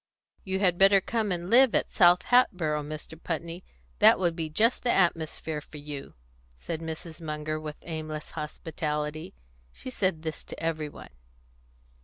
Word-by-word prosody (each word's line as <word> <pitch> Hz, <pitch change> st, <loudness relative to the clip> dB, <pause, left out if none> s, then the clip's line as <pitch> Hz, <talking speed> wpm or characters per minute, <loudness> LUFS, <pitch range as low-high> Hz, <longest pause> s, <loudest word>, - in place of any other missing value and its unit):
"You 190 Hz, 0 st, -2 dB
had 180 Hz, -3 st, +2 dB
better 195 Hz, 0 st, +7 dB
come 220 Hz, +1 st, -1 dB
and 175 Hz, -1 st, -2 dB
live 245 Hz, +3 st, +5 dB
at -, -, +1 dB
South 175 Hz, 0 st, +5 dB
Hatboro', 180 Hz, -12 st, +3 dB
Mr. 155 Hz, +2 st, -8 dB
Putney; 170 Hz, +1 st, -4 dB, 0.4 s
that -, -, +7 dB
would 175 Hz, -3 st, 0 dB
be 160 Hz, -2 st, -3 dB
just 225 Hz, +10 st, +2 dB
the 245 Hz, -, -1 dB
atmosphere 160 Hz, -3 st, 0 dB
for 150 Hz, -, -12 dB
you," 145 Hz, -1 st, -8 dB, 0.4 s
said 165 Hz, -, -5 dB
Mrs. 160 Hz, +1 st, -7 dB
Munger, 155 Hz, 0 st, -3 dB
with 155 Hz, -1 st, -7 dB
aimless 155 Hz, -2 st, -6 dB
hospitality. 150 Hz, -, -4 dB, 0.4 s
She 255 Hz, -, -8 dB
said 185 Hz, -9 st, -1 dB
this 160 Hz, -1 st, -5 dB
to -, -, -9 dB
every 155 Hz, -2 st, -2 dB
one. -, -, -12 dB
160 Hz, 155 wpm, -28 LUFS, 155-185 Hz, 0.4 s, better